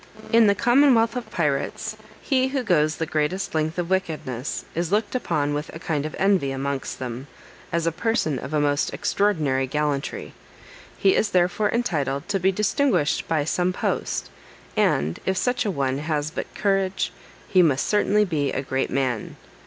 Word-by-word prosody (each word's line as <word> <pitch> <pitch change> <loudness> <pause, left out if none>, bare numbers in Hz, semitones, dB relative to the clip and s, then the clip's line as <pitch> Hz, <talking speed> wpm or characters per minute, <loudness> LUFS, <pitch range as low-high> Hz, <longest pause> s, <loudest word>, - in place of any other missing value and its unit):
In 230 -1 +7
the 200 - +4
commonwealth 240 0 +4
of 240 -3 -5
pirates, 155 +7 -1 0.3
he 260 -2 +2
who 265 -1 -2
goes 155 -7 +2
the 160 - -2
greatest 155 +5 -1
length 155 +1 -1
of 175 0 -2
wickedness, 150 -9 -2
is 170 +1 -2
looked 210 0 +1
upon 155 - 0
with 150 +1 -3
a - - -6
kind 155 -2 -2
of 155 - -8
envy 190 -7 +2
amongst 135 0 -3
them, 125 +1 -6 0.4
as 170 0 0
a 165 - +2
person 165 - 0
of 135 - -7
a 155 - +1
most 145 0 +1
extraordinary 150 -10 +1
gallantry; 145 0 -2 0.6
he 195 - +4
is 210 - +2
therefore 180 +3 +2
entitled 150 - -1
to 200 -1 +1
be 190 +2 +3
distinguished 210 - +1
by 155 -3 +1
some 180 +4 0
post, - - -2 0.4
and, 80 +3 +1
if 190 0 +1
such 245 +2 0
a - - +1
one 135 -4 -1
has 155 0 -2
but - - -5
courage, 195 -2 0 0.3
he 185 - +4
must 145 -6 +3
certainly 210 0 +3
be 145 -7 -1
a 135 - -2
great 135 0 -1
man. 130 -4 -1
165 Hz, 170 wpm, -24 LUFS, 145-205 Hz, 0.6 s, In